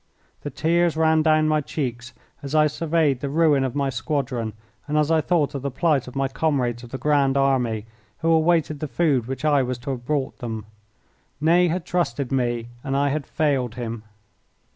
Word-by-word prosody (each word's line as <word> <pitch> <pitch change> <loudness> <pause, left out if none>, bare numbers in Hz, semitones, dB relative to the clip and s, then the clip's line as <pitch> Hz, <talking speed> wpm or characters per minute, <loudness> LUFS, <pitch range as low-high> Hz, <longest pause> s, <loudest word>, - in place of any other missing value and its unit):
The 145 - -5
tears 165 +3 +1
ran 160 0 +4
down 155 0 +3
my 155 0 +2
cheeks 125 -5 -4 0.3
as 140 +2 -4
I 155 0 +5
surveyed 150 -2 +1
the 140 - -3
ruin 150 -2 +3
of 130 -1 -3
my 140 -1 0
squadron, 125 -4 -2 0.3
and 150 +1 0
as 150 +1 +2
I 160 -1 +4
thought 155 -4 +1
of 140 - -4
the 140 - -2
plight 145 -1 +1
of 125 - -10
my 135 0 +1
comrades 130 -5 -1
of 120 - -11
the 130 - -5
Grand 140 -2 +2
Army 125 -6 +1 0.4
who 165 - +1
awaited 160 -2 +2
the 155 - -3
food 130 -3 +1
which 135 +3 -4
I 145 -2 +4
was 125 -1 -2
to 125 +3 -5
have 125 -2 -5
brought 140 0 -2
them. 110 -3 -5 0.7
Ney 170 +4 +4
had 175 +1 -2
trusted 140 -7 -1
me 120 -3 -1
and 135 0 -1
I 140 0 +2
had 145 +1 -2
failed 135 -6 0
him. 115 -2 -5
140 Hz, 195 wpm, -23 LUFS, 125-155 Hz, 0.7 s, I